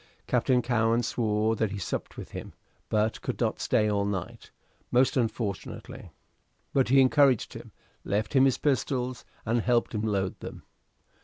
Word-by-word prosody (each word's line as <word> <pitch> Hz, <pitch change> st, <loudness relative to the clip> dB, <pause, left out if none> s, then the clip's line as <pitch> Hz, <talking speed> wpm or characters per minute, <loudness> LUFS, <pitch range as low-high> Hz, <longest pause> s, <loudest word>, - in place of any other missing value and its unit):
Captain 125 Hz, 0 st, +2 dB
Cowen 115 Hz, 0 st, +2 dB
swore 110 Hz, -1 st, +1 dB
that 110 Hz, -1 st, 0 dB
he 100 Hz, -, -5 dB
supped 90 Hz, -, -4 dB
with -, -, -8 dB
him, -, -, -7 dB, 0.4 s
but 110 Hz, +1 st, 0 dB
could -, -, -4 dB
not -, -, 0 dB
stay 105 Hz, -, +2 dB
all 100 Hz, -1 st, +1 dB
night, 100 Hz, -3 st, -4 dB, 0.4 s
most 125 Hz, +2 st, +3 dB
unfortunately. 115 Hz, -5 st, -3 dB, 0.6 s
But 135 Hz, -3 st, +2 dB
he 135 Hz, +1 st, +6 dB
encouraged 135 Hz, -2 st, +4 dB
him, -, -, -10 dB, 0.3 s
left 105 Hz, +1 st, -1 dB
him 135 Hz, -1 st, +6 dB
his 135 Hz, -, +3 dB
pistols, 130 Hz, -3 st, -1 dB, 0.2 s
and 115 Hz, +1 st, +1 dB
helped 120 Hz, 0 st, +1 dB
him 105 Hz, -, -1 dB
load 100 Hz, -4 st, -1 dB
them. -, -, -8 dB
115 Hz, 155 wpm, -28 LUFS, 105-125 Hz, 0.6 s, he